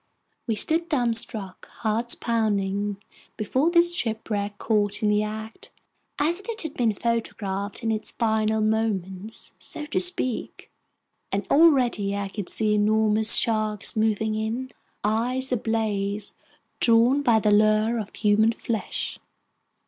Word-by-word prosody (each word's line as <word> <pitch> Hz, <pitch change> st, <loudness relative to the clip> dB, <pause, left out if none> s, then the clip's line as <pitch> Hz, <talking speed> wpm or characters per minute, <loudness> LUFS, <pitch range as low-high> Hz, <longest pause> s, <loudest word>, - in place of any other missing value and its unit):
We 225 Hz, -, 0 dB
stood 330 Hz, +9 st, +2 dB
dumbstruck, 230 Hz, -, 0 dB
hearts 230 Hz, +2 st, 0 dB
pounding, 205 Hz, -3 st, -1 dB, 0.4 s
before 260 Hz, +9 st, +1 dB
this 345 Hz, 0 st, +3 dB
shipwreck 215 Hz, -7 st, -3 dB
caught 210 Hz, -1 st, 0 dB
in 210 Hz, -, +3 dB
the 210 Hz, 0 st, +2 dB
act, 220 Hz, +1 st, -7 dB, 0.5 s
as 330 Hz, +5 st, 0 dB
if 400 Hz, -, -12 dB
it 455 Hz, -1 st, -1 dB
had 315 Hz, -3 st, -5 dB
been 230 Hz, -4 st, 0 dB
photographed 205 Hz, -3 st, -3 dB
in 225 Hz, -, 0 dB
its 220 Hz, 0 st, -2 dB
final 220 Hz, -1 st, 0 dB
moments, 215 Hz, -2 st, -2 dB
so 300 Hz, -, -4 dB
to 295 Hz, -, -1 dB
speak! 255 Hz, -9 st, -2 dB, 0.6 s
And 195 Hz, 0 st, -2 dB
already 255 Hz, -10 st, +3 dB
I 200 Hz, -1 st, -3 dB
could 200 Hz, -2 st, -6 dB
see 215 Hz, -1 st, 0 dB
enormous 215 Hz, +1 st, +4 dB
sharks 215 Hz, -1 st, +2 dB
moving 220 Hz, 0 st, 0 dB
in, 225 Hz, +4 st, -3 dB, 0.3 s
eyes 245 Hz, +5 st, 0 dB
ablaze, 210 Hz, -3 st, -1 dB, 0.5 s
drawn 235 Hz, +4 st, +4 dB
by 235 Hz, -5 st, +3 dB
the 210 Hz, -1 st, +2 dB
lure 215 Hz, +2 st, +3 dB
of 210 Hz, -2 st, -7 dB
human 215 Hz, +2 st, +3 dB
flesh! 225 Hz, -1 st, -4 dB
220 Hz, 130 wpm, -24 LUFS, 210-235 Hz, 0.6 s, enormous